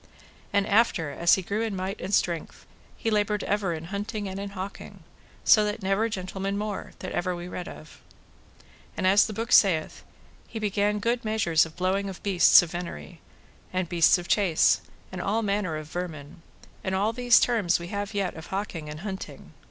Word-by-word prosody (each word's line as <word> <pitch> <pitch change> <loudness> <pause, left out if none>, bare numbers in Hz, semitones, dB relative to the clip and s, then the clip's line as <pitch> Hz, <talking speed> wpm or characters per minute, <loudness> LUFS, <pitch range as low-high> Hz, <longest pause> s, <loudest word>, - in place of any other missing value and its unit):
And 200 -1 +2
after, 200 -8 +2
as 170 +4 +4
he 190 - -4
grew 205 +5 -2
in 225 -3 -2
might 190 +2 -4
and 190 - -4
strength, 170 -4 -1 0.3
he 225 - -2
laboured 210 -1 +1
ever 200 -3 0
in 160 -1 -4
hunting 205 0 -3
and 190 0 -5
in 200 0 -5
hawking, 190 +1 -8 0.4
so 215 - +6
that 210 0 -3
never 195 +4 +1
gentleman 195 0 -3
more, 210 -1 -4
that 185 - -7
ever 180 0 -1
we 175 - -7
heard 180 - -8
read 180 - -5
of. 155 - -12 1.0
And - - -1
as 195 +4 +5
the - - -6
book 230 +3 -4
saith, 170 -6 +3 0.4
he 230 - -8
began 210 -1 0
good 235 +3 -1
measures 205 -8 +2
of 160 - -16
blowing 195 +2 0
of 190 - -9
beasts 190 -3 +6
of 165 - -7
venery, 170 - -7 0.5
and 185 -1 -1
beasts 170 0 +4
of 175 -1 -7
chase, 160 - +3 0.3
and 185 -1 -5
all 220 +5 0
manner 200 -6 -1
of 155 - -7
vermin, 160 -3 -6 0.4
and 190 0 -1
all 205 +4 +1
these 245 0 +5
terms 210 -9 +2
we 170 0 -7
have 205 +1 -4
yet 195 -3 -1
of 160 +1 -10
hawking 190 -6 -4
and 150 +2 -7
hunting. 190 -1 -7
195 Hz, 190 wpm, -26 LUFS, 175-210 Hz, 1.0 s, so